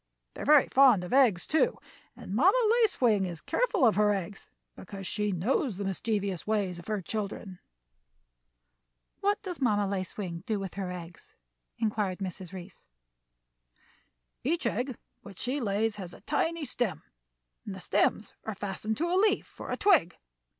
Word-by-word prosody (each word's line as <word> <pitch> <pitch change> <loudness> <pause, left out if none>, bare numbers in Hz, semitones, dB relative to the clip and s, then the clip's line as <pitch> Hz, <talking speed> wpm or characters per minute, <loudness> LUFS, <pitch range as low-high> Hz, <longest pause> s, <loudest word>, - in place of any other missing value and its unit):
They - - -8
are - - -4
very 295 -1 +6
fond 255 -8 +5
of 180 - -5
eggs, 240 -10 +4
too, 315 - +2 0.4
and - - -8
Mamma 365 - +5 0.2
Lace 440 -3 +2
Wing 220 -6 +3
is 170 -3 -5
careful 460 - +1
of 225 - +5
her 210 0 +4
eggs, 195 +1 -6 0.3
because 195 +1 -9
she 210 +2 -1
knows 200 - 0
the 200 - -3
mischievous 195 -1 -2
ways 200 -5 0
of 175 - -13
her 210 -3 -2
children." 200 -2 -4 1.6
"What 410 +1 +1
does 360 -6 -5
Mamma 210 -5 +2
Lace 190 -2 -3
Wing 175 -5 -4
do 215 -2 0
with 195 -2 -5
her 190 -2 -4
eggs?" 175 -1 -10 0.4
inquired 210 -4 -1
Mrs. 185 -2 -6
Reece. 185 -2 -10 1.6
"Each 330 +6 0
egg 250 +2 -1 0.2
which 195 -3 -12
she 260 - -2
lays 210 0 0
has 180 -3 -7
a - - -16
tiny 325 +1 -1
stem, 240 - -1 0.6
and 200 - -6
the - - -8
stems 205 +3 +1
are 220 - -4
fastened 205 +2 -3
to 330 - 0
a 345 - -1
leaf 405 +2 +1
or - - -3
twig. 350 - +3
210 Hz, 165 wpm, -29 LUFS, 190-260 Hz, 1.6 s, very